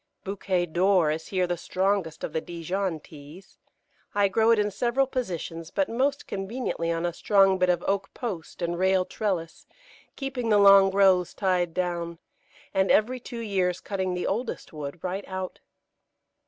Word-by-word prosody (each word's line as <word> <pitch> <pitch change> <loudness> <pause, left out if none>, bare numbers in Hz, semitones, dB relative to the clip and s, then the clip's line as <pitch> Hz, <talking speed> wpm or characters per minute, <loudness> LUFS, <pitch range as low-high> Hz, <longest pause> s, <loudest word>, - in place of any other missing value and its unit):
Bouquet 190 -2 -1
d'Or 175 -1 +3
is 160 +1 -4
here 185 -2 +1
the 175 0 -1
strongest 185 -3 -1
of - - -4
the 160 - 0
Dijon 175 +1 -3
Teas. 150 +5 -14 0.6
I 200 -1 +3
grow 220 +3 +3
it 230 - +6
in 210 0 +1
several 245 +6 +1
positions, 175 - -4
but 290 +8 0
most 275 +5 0
conveniently 195 -4 -3
on 165 +1 -1
a 175 - -1
strong 195 0 +3
bit 180 0 +3
of 175 -1 +1
oak 195 0 -1
post 185 -7 -5
and 170 0 -2
rail 190 0 +3
trellis, 180 -7 -3 0.5
keeping 265 -4 -3
the 210 - +5
long 195 -1 +8
growths 190 -2 +3
tied 180 -4 0
down, 170 -2 -2 0.6
and 190 0 +2
every 250 +4 +3
two 235 -1 -7
years 185 -4 0
cutting 185 -1 -2
the 180 - -2
oldest 225 -1 -3
wood 150 +1 -7
right 185 +2 -3
out. 185 -1 -5
190 Hz, 165 wpm, -26 LUFS, 175-205 Hz, 0.6 s, long